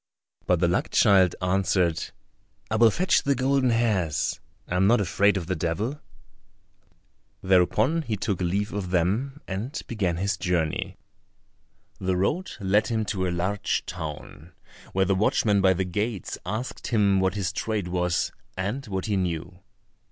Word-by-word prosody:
But 90 Hz, -2 st, +3 dB
the 85 Hz, -, +3 dB
luck 85 Hz, -, 0 dB
child 95 Hz, -3 st, +4 dB
answered, 90 Hz, -2 st, +1 dB, 0.7 s
"I -, -, +1 dB
will 115 Hz, 0 st, +7 dB
fetch 180 Hz, -, +2 dB
the 140 Hz, 0 st, +1 dB
golden 130 Hz, 0 st, +2 dB
hairs, 105 Hz, -10 st, 0 dB, 0.3 s
I 90 Hz, -, -3 dB
am 95 Hz, +1 st, +4 dB
not 120 Hz, +2 st, +5 dB
afraid 100 Hz, +1 st, +2 dB
of 90 Hz, -, -3 dB
the 90 Hz, +2 st, -2 dB
Devil;" 95 Hz, -, -2 dB, 1.4 s
thereupon 100 Hz, -, +3 dB
he 115 Hz, -8 st, -3 dB
took 95 Hz, -2 st, -2 dB
leave 100 Hz, +4 st, -1 dB
of 100 Hz, -3 st, -3 dB
them 105 Hz, -, 0 dB
and 110 Hz, -, -4 dB
began 95 Hz, -7 st, -1 dB
his 100 Hz, +2 st, -1 dB
journey. 90 Hz, +1 st, -1 dB, 1.0 s
The 95 Hz, -1 st, 0 dB
road 165 Hz, -, 0 dB
led 105 Hz, +2 st, +2 dB
him 110 Hz, -2 st, -1 dB
to 95 Hz, -2 st, -1 dB
a -, -, 0 dB
large 90 Hz, +4 st, -1 dB
town, 80 Hz, -1 st, -8 dB, 0.4 s
where 95 Hz, 0 st, +2 dB
the 95 Hz, -, +2 dB
watchman 100 Hz, +1 st, +2 dB
by 95 Hz, -1 st, +5 dB
the 95 Hz, +1 st, -1 dB
gates 105 Hz, +1 st, -3 dB
asked 110 Hz, +6 st, -4 dB
him 100 Hz, -4 st, +3 dB
what 95 Hz, 0 st, +1 dB
his 95 Hz, -2 st, -2 dB
trade 105 Hz, -3 st, -2 dB
was, 90 Hz, -1 st, 0 dB, 0.3 s
and 100 Hz, +9 st, -2 dB
what 95 Hz, -2 st, -3 dB
he 105 Hz, -, 0 dB
knew. 90 Hz, -1 st, -3 dB
95 Hz, 155 wpm, -25 LUFS, 90-110 Hz, 1.4 s, will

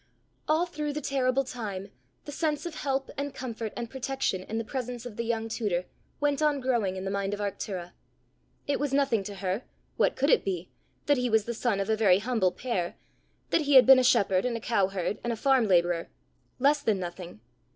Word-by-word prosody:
All 315 Hz, +3 st, +3 dB
through 300 Hz, -4 st, -4 dB
the 300 Hz, -, -2 dB
terrible 270 Hz, -1 st, +1 dB
time, 205 Hz, -6 st, -6 dB, 0.3 s
the 290 Hz, -, -6 dB
sense 305 Hz, 0 st, -1 dB
of 340 Hz, -, -4 dB
help 270 Hz, -3 st, -2 dB
and 285 Hz, 0 st, -3 dB
comfort 230 Hz, -4 st, -5 dB
and 235 Hz, -, -3 dB
protection 265 Hz, -6 st, -2 dB
in 215 Hz, +4 st, -5 dB
the 225 Hz, -, -1 dB
presence 245 Hz, 0 st, -5 dB
of 240 Hz, -4 st, -7 dB
the -, -, -2 dB
young 225 Hz, -1 st, -1 dB
tutor, 205 Hz, -6 st, -1 dB, 0.3 s
went 290 Hz, 0 st, +1 dB
on 300 Hz, -2 st, +2 dB
growing 235 Hz, -8 st, 0 dB
in 190 Hz, 0 st, -5 dB
the 195 Hz, -, -2 dB
mind 200 Hz, 0 st, -1 dB
of -, -, -12 dB
Arctura. 190 Hz, -3 st, -4 dB, 0.7 s
It 285 Hz, -, 0 dB
was 285 Hz, -2 st, -1 dB
nothing 275 Hz, -6 st, +2 dB
to 205 Hz, -, -6 dB
her 190 Hz, +2 st, -2 dB, 0.4 s
what -, -, +2 dB
could 280 Hz, +3 st, +2 dB
it -, -, +4 dB
be? 180 Hz, -2 st, -3 dB, 0.3 s
that 290 Hz, -1 st, +3 dB
he 250 Hz, 0 st, 0 dB
was 220 Hz, -2 st, +3 dB
the 235 Hz, -, -3 dB
son 230 Hz, -3 st, 0 dB
of 195 Hz, -, -1 dB
a 220 Hz, -, +2 dB
very 200 Hz, -4 st, +5 dB
humble 215 Hz, -3 st, +1 dB
pair; 190 Hz, -8 st, -3 dB, 0.6 s
that -, -, +3 dB
he 290 Hz, -2 st, +2 dB
had 260 Hz, -, +9 dB
been 265 Hz, 0 st, +9 dB
a -, -, +3 dB
shepherd, 195 Hz, -7 st, +3 dB
and 245 Hz, -2 st, -1 dB
a -, -, -6 dB
cow 205 Hz, -4 st, +1 dB
herd, 195 Hz, +1 st, -3 dB
and 240 Hz, -, -1 dB
a -, -, -1 dB
farm 260 Hz, -1 st, +3 dB
labourer 175 Hz, -2 st, +2 dB, 0.5 s
less 285 Hz, +3 st, +3 dB
than 220 Hz, -7 st, +1 dB
nothing. 175 Hz, -, -7 dB
235 Hz, 215 wpm, -28 LUFS, 195-270 Hz, 0.7 s, had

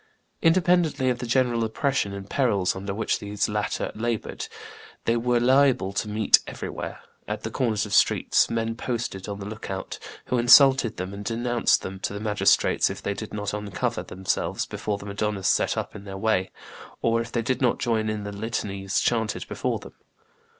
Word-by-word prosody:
Independently 165 Hz, -6 st, +3 dB
of 125 Hz, -, -3 dB
the 125 Hz, -, -4 dB
general 120 Hz, -1 st, +2 dB
oppression 115 Hz, -1 st, 0 dB
and 100 Hz, 0 st, -7 dB
perils 100 Hz, -8 st, +1 dB
under 100 Hz, +1 st, -4 dB
which 105 Hz, +3 st, -1 dB
these 105 Hz, 0 st, -1 dB
latter 105 Hz, -1 st, -2 dB
labored, 115 Hz, 0 st, -3 dB, 0.6 s
they 115 Hz, -, +2 dB
were 120 Hz, +1 st, +2 dB
liable 130 Hz, -5 st, +3 dB
to 105 Hz, -, -1 dB
meet 105 Hz, 0 st, +5 dB
everywhere, -, -, -6 dB, 0.3 s
at -, -, -4 dB
the -, -, -4 dB
corners 110 Hz, -5 st, 0 dB
of 105 Hz, -, -9 dB
the -, -, +2 dB
streets, -, -, +3 dB
men 115 Hz, 0 st, -1 dB
posted 115 Hz, -5 st, -4 dB
on 100 Hz, 0 st, -5 dB
the 100 Hz, -, -6 dB
lookout, 100 Hz, -3 st, -6 dB, 0.3 s
who 125 Hz, -, 0 dB
insulted 130 Hz, -1 st, +6 dB
them 90 Hz, +2 st, -4 dB
and 100 Hz, +1 st, -7 dB
denounced 120 Hz, +1 st, +1 dB
them 95 Hz, 0 st, -6 dB
to 95 Hz, -, -3 dB
the 100 Hz, -, -4 dB
magistrates 105 Hz, -1 st, +3 dB
if -, -, -5 dB
they 100 Hz, -, -1 dB
did 110 Hz, +1 st, -7 dB
not 105 Hz, -1 st, -3 dB
uncover 105 Hz, -2 st, -2 dB
themselves 95 Hz, +1 st, -2 dB
before 105 Hz, -1 st, -3 dB
the 100 Hz, -, -10 dB
madonnas 100 Hz, -1 st, -2 dB
set -, -, +2 dB
up -, -, -4 dB
in -, -, -8 dB
their 95 Hz, -1 st, -7 dB
way, 95 Hz, -2 st, +1 dB, 0.5 s
or 115 Hz, 0 st, +2 dB
if 115 Hz, 0 st, -7 dB
they 115 Hz, -, -1 dB
did 130 Hz, +3 st, -1 dB
not 125 Hz, -3 st, +3 dB
join 110 Hz, -2 st, 0 dB
in 105 Hz, -1 st, -3 dB
the 100 Hz, -, -5 dB
litanies 100 Hz, -2 st, -2 dB
chanted 115 Hz, -3 st, 0 dB
before -, -, -2 dB
them. -, -, -12 dB
110 Hz, 185 wpm, -25 LUFS, 100-120 Hz, 0.6 s, insulted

